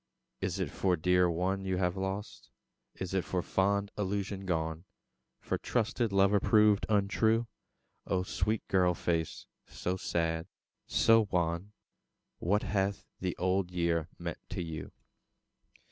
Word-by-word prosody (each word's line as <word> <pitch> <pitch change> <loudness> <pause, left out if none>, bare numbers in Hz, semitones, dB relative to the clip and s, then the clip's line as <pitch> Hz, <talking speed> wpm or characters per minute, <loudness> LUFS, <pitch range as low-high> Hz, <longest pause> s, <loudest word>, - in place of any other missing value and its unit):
Is - - -2
it - - -1
for 95 -2 +1
dear 90 +2 +3
one 95 +3 0
you 95 -1 -1
have 90 0 +1
lost? 95 +2 -4 0.5
Is 95 0 -5
it 95 -2 +1
for 90 -2 -2
fond 100 +1 +1
illusion 100 -1 -2
gone? 80 0 -1 0.6
For - - -2
trusted 115 -1 0
lover 100 +1 +4
proved 105 0 +4
untrue? 110 +3 +2 0.6
O 95 -1 +1
sweet 95 +4 -1
girl 90 -2 +3
face, 80 -1 -1 0.2
so 90 +1 -3
sad, 80 -2 -1 0.4
so 115 -2 +4
wan 85 +3 -1 0.7
What 100 +5 +1
hath 100 0 -1
the 90 -2 -2
Old 95 0 +1
Year 85 -2 0
meant 85 -2 -5
to - - -3
you? 80 -3 -6
95 Hz, 130 wpm, -31 LUFS, 90-100 Hz, 0.7 s, lover